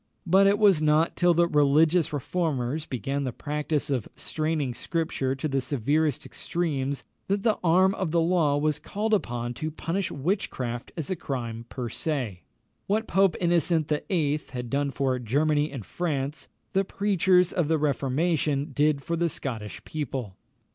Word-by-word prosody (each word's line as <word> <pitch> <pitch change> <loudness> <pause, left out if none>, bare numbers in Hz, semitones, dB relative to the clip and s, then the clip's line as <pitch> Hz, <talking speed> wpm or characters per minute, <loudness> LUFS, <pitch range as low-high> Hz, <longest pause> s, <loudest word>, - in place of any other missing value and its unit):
But 190 +3 +5
it 200 +1 +4
was 200 -7 +5
not 155 +2 +3
till 175 -1 +3
the 170 +1 +4
religious 155 +3 +3
reformers 150 -1 -2
began 135 +3 -2
the 130 - -2
practice 150 +2 -2
of 125 -6 -1
straining 155 -5 -2
Scripture 140 -2 -2
to 135 +3 -2
the 135 -2 0
severest 145 +3 0
extremes 140 -6 -2 0.2
that 200 +1 0
the 220 -2 +2
arm 185 +3 +4
of 190 -4 -2
the 170 +2 +2
law 165 -4 +2
was 150 0 0
called 220 +2 -2
upon 120 - -1
to 155 +6 -4
punish 165 +4 -2
witchcraft 135 - -2
as 160 +2 -3
a - - +1
crime 120 -7 -5
per 125 -2 -4
se. 125 - -3 0.5
What 215 +3 +1
Pope 190 -3 +3
Innocent 170 -2 +2
VIII. 150 -1 0
had 125 -2 -5
done 140 +1 +1
for 135 -2 0
Germany 145 +5 +1
and 130 -8 -7
France, 145 -4 -3 0.3
the 195 - +3
preachers 190 -2 +2
of 175 -6 +1
the 160 +1 +2
Reformation 145 +1 0
did 145 0 +2
for 170 - -1
the 170 0 +1
Scottish 110 -8 -5
people. 130 -9 -4
150 Hz, 160 wpm, -26 LUFS, 135-170 Hz, 0.5 s, But